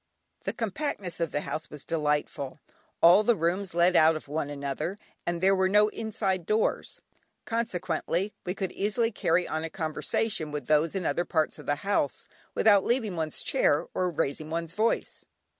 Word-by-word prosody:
The -, -, -1 dB
compactness 210 Hz, -, -3 dB
of 165 Hz, -1 st, 0 dB
the 145 Hz, -, -1 dB
house 155 Hz, -, -4 dB
was 150 Hz, -, -9 dB
delightful. 150 Hz, -3 st, -1 dB, 0.4 s
All 175 Hz, +5 st, +8 dB
the 230 Hz, +2 st, +3 dB
rooms 175 Hz, +2 st, -1 dB
led 175 Hz, +1 st, +4 dB
out 160 Hz, 0 st, +6 dB
of 155 Hz, -, -7 dB
one 145 Hz, 0 st, -2 dB
another, 145 Hz, +6 st, -3 dB, 0.3 s
and 170 Hz, 0 st, -1 dB
there 195 Hz, +1 st, +5 dB
were 190 Hz, 0 st, +2 dB
no 210 Hz, +2 st, +5 dB
inside 195 Hz, -5 st, -2 dB
doors, 215 Hz, +1 st, 0 dB, 0.4 s
consequently 185 Hz, -4 st, -1 dB
one 180 Hz, +1 st, -3 dB
could 190 Hz, -2 st, -3 dB
easily 225 Hz, +3 st, 0 dB
carry 175 Hz, -4 st, +1 dB
on 155 Hz, 0 st, -2 dB
a 165 Hz, -, -3 dB
conversation 160 Hz, +2 st, -1 dB
with 150 Hz, -1 st, -4 dB
those 155 Hz, +4 st, +2 dB
in 185 Hz, -3 st, -2 dB
other 175 Hz, -, +1 dB
parts 160 Hz, -3 st, 0 dB
of -, -, -11 dB
the 145 Hz, -, +2 dB
house 195 Hz, -9 st, 0 dB, 0.3 s
without 205 Hz, -3 st, +5 dB
leaving 230 Hz, -6 st, 0 dB
one's 160 Hz, -2 st, -2 dB
chair 150 Hz, +3 st, +2 dB
or 180 Hz, -1 st, 0 dB
raising 155 Hz, -1 st, -2 dB
one's 165 Hz, 0 st, -3 dB
voice. 220 Hz, +3 st, -1 dB
175 Hz, 175 wpm, -28 LUFS, 155-200 Hz, 0.4 s, All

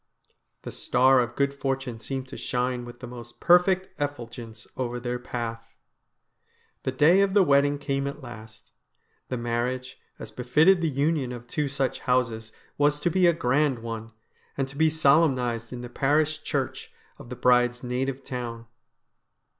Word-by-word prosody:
The -, -, -6 dB
star 130 Hz, +1 st, +3 dB
of 120 Hz, -1 st, -1 dB
good 140 Hz, 0 st, +1 dB
fortune 135 Hz, -4 st, -3 dB
seemed 135 Hz, +3 st, -4 dB
to -, -, -8 dB
shine 125 Hz, 0 st, -2 dB
with 120 Hz, 0 st, -11 dB
the -, -, -6 dB
most 120 Hz, -1 st, -10 dB
perfect 185 Hz, +2 st, +4 dB
effulgence 120 Hz, -5 st, -5 dB
over 125 Hz, -1 st, -3 dB
their 120 Hz, 0 st, -3 dB
path. 115 Hz, -2 st, -6 dB, 1.1 s
The 130 Hz, -, -2 dB
day 155 Hz, +9 st, +5 dB
of 200 Hz, 0 st, +1 dB
the 200 Hz, -, +7 dB
wedding 145 Hz, -2 st, +3 dB
came 140 Hz, -1 st, -2 dB
at 140 Hz, -, -5 dB
last. 110 Hz, -3 st, -11 dB, 0.6 s
The 125 Hz, -, -2 dB
marriage, 120 Hz, +2 st, -3 dB, 0.2 s
as -, -, -9 dB
befitted 155 Hz, +9 st, +3 dB
the 165 Hz, -, +1 dB
union 140 Hz, -1 st, 0 dB
of 120 Hz, -1 st, -8 dB
two 145 Hz, +4 st, -2 dB
such 135 Hz, -1 st, -1 dB
houses, 115 Hz, -3 st, 0 dB, 0.3 s
was 145 Hz, 0 st, +3 dB
to 175 Hz, -, +1 dB
be 185 Hz, +1 st, +4 dB
a -, -, +6 dB
grand 140 Hz, -2 st, +1 dB
one, 115 Hz, -1 st, -6 dB, 0.5 s
and 135 Hz, -1 st, 0 dB
to 135 Hz, -, -10 dB
be 160 Hz, +2 st, +4 dB
solemnised 140 Hz, -7 st, +2 dB
in 125 Hz, -1 st, -6 dB
the 120 Hz, -, -6 dB
parish 150 Hz, +5 st, +1 dB
church 135 Hz, -3 st, -3 dB, 0.3 s
of 120 Hz, -, -11 dB
the 125 Hz, -, -5 dB
bride's 125 Hz, 0 st, +3 dB
native 130 Hz, +2 st, -2 dB
town. 120 Hz, -3 st, -5 dB
130 Hz, 160 wpm, -26 LUFS, 120-145 Hz, 1.1 s, the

